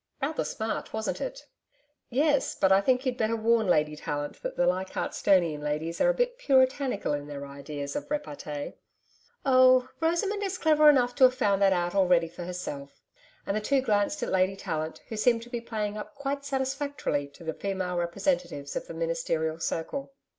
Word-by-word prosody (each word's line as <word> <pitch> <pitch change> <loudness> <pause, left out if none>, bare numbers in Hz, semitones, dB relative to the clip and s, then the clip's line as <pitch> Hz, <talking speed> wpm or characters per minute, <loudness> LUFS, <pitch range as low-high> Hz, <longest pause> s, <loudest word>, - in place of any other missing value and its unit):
Rather 300 +3 -1
smart, 220 -1 -4
wasn't 220 0 -2
it?' - - -5 0.6
'Yes, 285 +2 +2
but 190 - +2
I 190 +1 +6
think 255 +5 +2
you'd 250 -1 -1
better 220 +1 +1
warn 225 -1 +2
Lady 150 -3 +2
Tallant 145 -1 -4
that - - -5
the 175 - +3
Leichardt'stonian 180 -2 +1
ladies 150 +3 -3
are - - +5
a - - +4
bit - - 0
Puritanical 260 - +2
in 145 0 -4
their 140 -1 -6
ideas 140 0 -6
of 290 0 -4
repartee.' 150 - -4 0.7
'Oh, 255 -1 +5
Rosamond 345 +6 0
is 385 -2 -2
clever 305 -2 +5
enough 250 -4 +4
to 260 - +6
have 255 0 +4
found 200 -6 +1
that 195 -1 +5
out 175 -1 0
already 180 -4 +3
for 170 +1 -8
herself;' 160 -6 -7 0.4
and 200 - -1
the 215 - 0
two 275 +6 +2
glanced 215 +3 0
at - - -2
Lady 190 +1 +2
Tallant, 160 -4 -4
who 225 - -4
seemed 230 +1 +2
to 240 - -14
be 240 -2 -3
playing 215 -2 -3
up 210 - -9
quite 280 0 -3
satisfactorily 270 - -2
to 140 +4 -15
the 160 -1 -3
female 190 -1 -3
representatives 175 -4 -1
of - - -4
the 165 - -8
Ministerial 165 -1 -1
circle. 275 +14 -3
205 Hz, 185 wpm, -28 LUFS, 165-265 Hz, 0.7 s, I